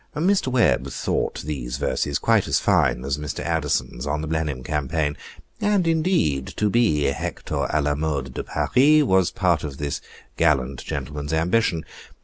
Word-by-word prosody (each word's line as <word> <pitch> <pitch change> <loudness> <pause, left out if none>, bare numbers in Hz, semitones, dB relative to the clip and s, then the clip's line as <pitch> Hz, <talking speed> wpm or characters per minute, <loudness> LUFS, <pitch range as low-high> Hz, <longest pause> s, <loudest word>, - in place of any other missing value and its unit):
Mr. 185 +2 +2
Webb 85 - +2
thought 65 - -2
these 65 -5 -4
verses 70 -1 -1
quite - - +2
as - - +2
fine 60 - +2
as 70 +1 -1
Mr. 75 -1 -4
Addison's 75 -6 -1
on 75 +1 -1
the 80 - -4
Blenheim 75 -5 -2
Campaign, 75 +1 -1 0.4
and, 205 -3 +2
indeed, 160 - +1
to 105 -1 +1
be 105 -11 +3
Hector 70 -1 -2
a - - +1
la 75 0 +1
mode 70 -4 -2
de - - -4
Paris, 150 +4 +3
was 95 - +3
part 90 -5 +1
of 70 -3 -5
this 70 -2 -3 0.4
gallant 70 -5 +1
gentleman's 75 +1 -4
ambition. 85 0 +1
75 Hz, 155 wpm, -23 LUFS, 70-95 Hz, 0.4 s, be